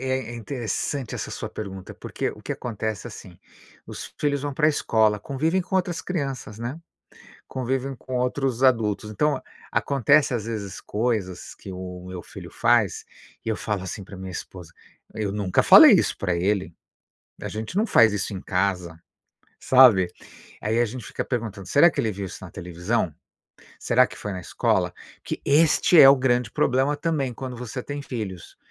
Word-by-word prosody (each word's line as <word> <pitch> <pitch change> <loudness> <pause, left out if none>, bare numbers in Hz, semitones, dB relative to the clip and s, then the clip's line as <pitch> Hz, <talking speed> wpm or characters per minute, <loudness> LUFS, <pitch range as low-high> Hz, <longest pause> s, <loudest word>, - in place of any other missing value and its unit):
é 130 -3 -4
é 120 - -7
interessante 120 +1 -3
essa - - -5
sua - - -5
pergunta, 95 -3 -7
porque - - -4
o - - -11
que - - -5
acontece 110 -4 -4
é, - - -8
assim, 90 -2 -12 0.5
os - - -8
filhos 145 -2 0
vão 145 -1 -3
pra 155 +2 +3
a - - +6
escola, 110 -7 +2
convivem 155 - 0
com 190 - -4
outras 180 -2 0
crianças, 135 - -4
né, 125 +7 -5 0.7
convivem 130 +1 -2
com 130 +1 -7
outros 125 0 -1
adultos. 110 -4 +2
Então, 150 +8 0 0.3
acontecem, 140 0 +3
às 110 -3 -4
vezes, 105 -5 -5
coisas 105 -5 -2
que 95 - -10
o 90 -1 -7
meu 90 -1 -6
filho - - -10
faz - - +2 0.4
e 115 - -2
eu 110 - 0
falo 105 -3 -3
assim 95 +2 -6
pra 100 0 -11
minha 95 0 -7
esposa: 90 -2 -8 0.4
"Eu 105 -3 -2
nunca 100 -3 +1
falei - - +10
isso - - +2
pra 90 -3 -1
ele, 95 -1 0 0.7
a - - -5
gente 110 - -6
não 220 +3 +2
faz 115 - +5
isso 105 0 -3
em 95 - -5
casa", 90 -4 -1 0.6
sabe? 120 -9 +6 0.5
Aí 110 +2 0
a - - +4
gente 120 0 -6
fica - - -4
perguntando: 110 -6 -4
"Será 160 +4 +6
que 145 - -2
ele 110 -5 -1
viu 100 0 -5
isso - - -9
na - - -10
televisão? 90 +1 -2 0.6
Será 125 +2 +3
que - - -12
foi 105 - -5
na 90 - -5
escola?" 85 - 0 0.3
Porque - - -5
este 155 +3 +5
é 135 - +10
o 140 - +8
grande 125 -3 +1
problema 135 +6 +1
também 145 -4 -1
quando 130 +1 -6
você 125 +1 -6
tem 145 +2 -5
filhos, 105 -10 -6
115 Hz, 180 wpm, -24 LUFS, 100-135 Hz, 0.7 s, falei